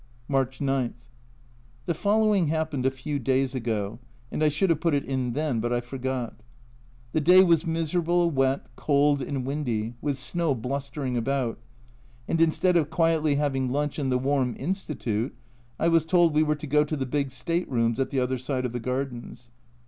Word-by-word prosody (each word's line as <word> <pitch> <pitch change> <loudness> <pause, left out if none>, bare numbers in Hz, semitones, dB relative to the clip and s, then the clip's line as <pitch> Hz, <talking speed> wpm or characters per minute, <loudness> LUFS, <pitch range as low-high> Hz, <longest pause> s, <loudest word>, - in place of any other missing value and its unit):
March 135 -2 0
9. 135 -3 0 0.9
The 170 - 0
following 205 0 +2
happened 155 -4 0
a - - +5
few 135 +2 -4
days 130 +1 +1
ago, 110 -4 -2 0.3
and 155 - -1
I 155 - +5
should 160 +5 +1
have 160 - +1
put 165 -4 +2
it 140 - -1
in 130 -3 -2
then, 145 -4 -1
but 120 +2 -1
I 120 - +2
forgot. 125 0 -4 0.8
The 155 - +1
day 180 +5 +7
was 170 -1 +3
miserable, 170 +1 +1
wet, 135 -1 +1
cold, 145 -1 +2
and 130 -1 -3
windy, 120 -6 -2
with 145 -2 -1
snow 160 +1 0
blustering 135 +1 -3
about, 125 -1 -1 0.7
and 165 - +1
instead 175 +2 +3
of 155 -3 +1
quietly 160 -2 +2
having 135 -3 0
lunch 145 +2 -1
in 135 -2 -1
the 125 - +2
warm 130 -2 0
Institute 135 - -2 0.4
I 165 - +2
was 165 -1 +4
told 170 -1 +3
we 155 - +4
were 150 -1 +2
to 150 - -8
go 150 +1 +3
to 150 +1 -3
the 135 - -2
big 140 +1 -1
state 170 +7 -2
rooms 115 -2 +1
at 130 -1 0
the 135 - 0
other 125 0 -1
side 130 0 -2
of 125 - -3
the 120 - -2
gardens. 125 -1 -5
140 Hz, 185 wpm, -26 LUFS, 130-160 Hz, 0.9 s, day